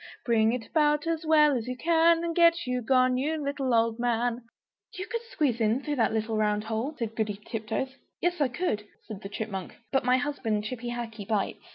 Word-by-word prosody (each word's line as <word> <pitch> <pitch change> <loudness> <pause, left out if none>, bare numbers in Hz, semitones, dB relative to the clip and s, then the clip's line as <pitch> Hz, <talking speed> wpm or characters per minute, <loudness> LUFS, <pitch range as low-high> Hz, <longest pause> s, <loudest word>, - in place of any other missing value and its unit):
Bring 225 -2 +3
it 240 -2 -3
about 300 -1 +2
as 330 -1 -2
well 300 -2 +5
as 235 -1 -3
you 250 0 -4
can, 335 +2 +4
And 335 -1 -2
get 335 -2 +4
you 250 0 -1
gone, 255 +1 +3
you 305 +4 -1
little 280 -2 -2
old 230 0 +2
man!" 240 0 0 0.5
"You 370 - -4
could 465 +2 -3
squeeze 280 - 0
in, 225 +5 +2
through 295 -2 -2
that 225 - +2
little 220 0 -1
round 210 -1 +1
hole," 225 +7 -3
said 225 -3 -4
Goody 210 -2 -2
Tiptoes. 230 +4 -3 0.2
"Yes, 350 -2 0
I 285 - +4
could," 245 - -2 0.2
said 215 -3 -8
the 195 - -7
Chipmunk, 200 -3 -5
"but 270 0 +2
my 250 +1 +4
husband, 255 -7 -1
Chippy 240 +1 -4
Hackee, 225 -4 -5
bites!" 210 -3 -1
250 Hz, 205 wpm, -28 LUFS, 220-295 Hz, 0.5 s, well